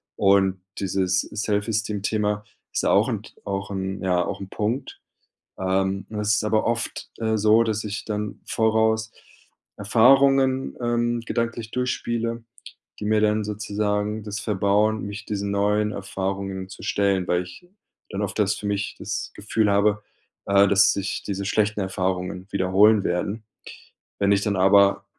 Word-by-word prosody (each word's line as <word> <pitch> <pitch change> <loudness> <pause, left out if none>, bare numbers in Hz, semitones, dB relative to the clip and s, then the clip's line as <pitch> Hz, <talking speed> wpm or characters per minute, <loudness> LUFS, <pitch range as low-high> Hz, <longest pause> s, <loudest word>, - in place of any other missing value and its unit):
Und 95 -2 +3 0.2
dieses 95 -1 +1
Self-Esteem 105 0 -2
Thema 105 -1 0 0.3
ist - - -1
ja - - +2
auch - - +4
'n - - -3
T - - -14
auch 100 0 -4
'n 95 0 -3
ja, 90 -2 +2
auch - - -4
'n 95 -1 -8
Punkt. 120 +6 -3 0.6
Ähm, 95 +1 0
es 105 0 0
ist 105 - 0
aber 110 0 +1
oft, 115 0 -2
äh, 110 -1 0
so, 110 +2 +5
dass 110 -1 -2
ich 105 +1 -4
dann 105 -1 -4
voraus 110 0 +1 0.7
Erfahrungen, 130 +5 +4
ähm, 120 0 0
gedanklich 115 -1 -3
durchspiele, 115 -2 -2 0.6
die 105 - -4
mir 105 0 +2
dann 105 0 +2
sozusagen 105 0 -2
das 105 0 -5
verbauen, 105 +1 +1
mich 105 0 -7
diesen 100 -1 -3
neuen 105 +1 +1
Erfahrungen 95 -1 -4
zu - - -11
stellen, 100 -2 +1
weil 90 0 +2
ich 90 - -13 0.4
dann 100 - -3
oft 105 - -4
das 100 -1 +2
für 105 - -6
mich 100 0 -2
das - - -4
Gefühl 105 0 0
habe, 105 +1 +2 0.4
äh, 100 0 +5
dass 100 0 +5
sich 100 - -3
diese 100 0 -3
schlechten 105 +2 0
Erfahrungen 95 -1 -2
wiederholen 100 +2 +4
werden. 100 +5 -2 0.8
Wenn 100 0 +3
ich 100 0 +3
dann 100 -1 0
aber 100 +1 +4
105 Hz, 150 wpm, -24 LUFS, 100-110 Hz, 0.8 s, so